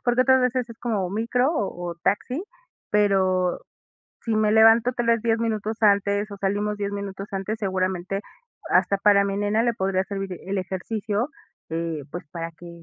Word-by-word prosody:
Porque 245 +1 +3
otras 260 0 +5
veces 250 -1 0
es 230 - -11
como 210 -6 -1
micro 235 +6 +1
o 175 - -3
o - - -6
taxi, 250 - 0 0.5
pero, 190 -3 +2 0.6
si 225 -2 -1
me 215 -1 +3
levanto 225 +2 +6
tal 240 -1 -2
vez 230 -1 +3
10 230 -1 +1
minutos 220 -1 -2
antes 200 0 +3
o 200 - -5
salimos 205 +1 -1
10 200 -1 -2
minutos 200 -1 -5
antes, 195 +2 -2
seguramente 190 -1 -1 0.5
hasta 200 - +3
para 200 0 +5
mi 200 0 -2
nena 205 +2 +1
le 235 -1 +2
podría 190 -2 0
servir 195 -2 -5
el 195 +1 -2
ejercicio, 205 - -2 0.4
eh, 165 -2 -3
pues 175 - -6
para 165 -1 -5
que 175 +1 -13
205 Hz, 175 wpm, -24 LUFS, 190-225 Hz, 0.6 s, levanto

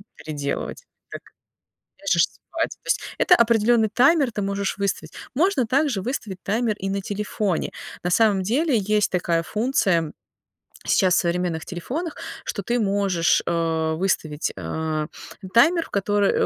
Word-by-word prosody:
переделывать. 145 -2 -4 0.3
Так - - -7 0.8
ляжешь - - +3
спать. - - -4
То - - -17
есть - - +1 0.2
это 360 - +6
определенный 230 -1 +3
таймер 265 +4 +4
ты 210 - -3
можешь 200 0 -2
выставить. 200 -1 -2 0.2
Можно 345 -4 +2
также 270 -4 +1
выставить 200 -5 -4
таймер 220 +1 0
и 195 - -3
на 195 0 -1
телефоне. 205 -2 -2 0.3
На 180 - -1
самом 205 -2 +3
деле 265 - +2
есть 210 0 +1
такая 170 -2 0
функция 190 - +1 0.7
сейчас 185 -3 +3
в - - +4
современных 170 -2 -1
телефонах, 275 - -5 0.3
что 200 - -4
ты 240 +4 0
можешь, 195 -4 +2
э, 160 -1 0
выставить, 160 -4 -1
а, 155 - -2 0.5
таймер, 330 +8 +5
в - - -15
который 205 0 +2
200 Hz, 140 wpm, -23 LUFS, 175-235 Hz, 0.8 s, это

